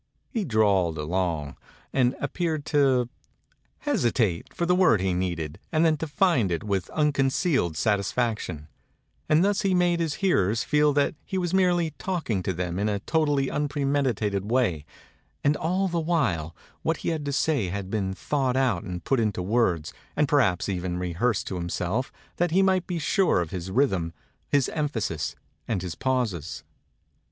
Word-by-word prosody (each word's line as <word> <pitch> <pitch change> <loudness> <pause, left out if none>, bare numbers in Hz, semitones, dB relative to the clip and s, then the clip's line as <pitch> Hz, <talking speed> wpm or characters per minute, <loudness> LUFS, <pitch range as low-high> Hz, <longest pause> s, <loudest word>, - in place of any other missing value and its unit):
He 225 -6 -1
drawled 100 - +2
along 80 -2 -2 0.4
and 125 -1 +2
appeared 160 -5 -2
to 135 -5 +3 0.8
hesi 120 - +2
tate 95 -9 0
for 170 - -2
the 180 - +3
word 180 - +4
he 95 0 0
needed 85 -3 -3
and 160 0 +3
then 160 -1 +4
to 160 - -4
find 145 - +2
it 85 - -1
with 100 -4 -1
unconcealed 135 - +1
satisfaction; 105 -6 -1 0.6
and 155 +4 +5
thus 205 0 +1
he 195 -3 +2
made 175 -1 +2
his 160 -3 -1
hearers 115 - +2
feel 150 0 +3
that 140 0 +2
he 190 - -4
was 175 -1 -1
merely 175 -3 +3
talking 160 - -1
to 95 - -1
them 90 0 -3
in 105 +1 +1
a 100 - 0
totally 145 -2 +1
unpremeditated 135 -9 0
way, 110 - +1 0.6
and 145 +1 +3
all 185 +5 0
the 170 -2 -1
while 145 - 0 0.3
what - - 0
he - - +2
had 160 -3 -2
to 140 - -1
say 140 -6 +1
had 95 +1 -4
been 100 -3 -1
thought 130 - 0
out 125 -9 +2
and 90 -1 -6
put 135 - +1
into 105 -5 0
words, 90 -7 +1 0.2
and 150 0 +2
perhaps 105 - +2
even 90 -2 -2
re 90 -1 -3
hearsed 115 +5 0
to 95 - -4
himself 90 +7 -2 0.3
that 175 0 +2
he 185 +4 +3
might 190 -2 +2
be 180 - -2
sure 180 - +2
of 85 -2 -3
his 90 0 -5
rhythm, 95 -8 +1 0.4
his 140 -3 +3
emphasis, 115 - -2 0.3
and 100 -6 -1
his 90 -3 -4
pauses. 110 - -2
125 Hz, 170 wpm, -26 LUFS, 90-155 Hz, 0.8 s, and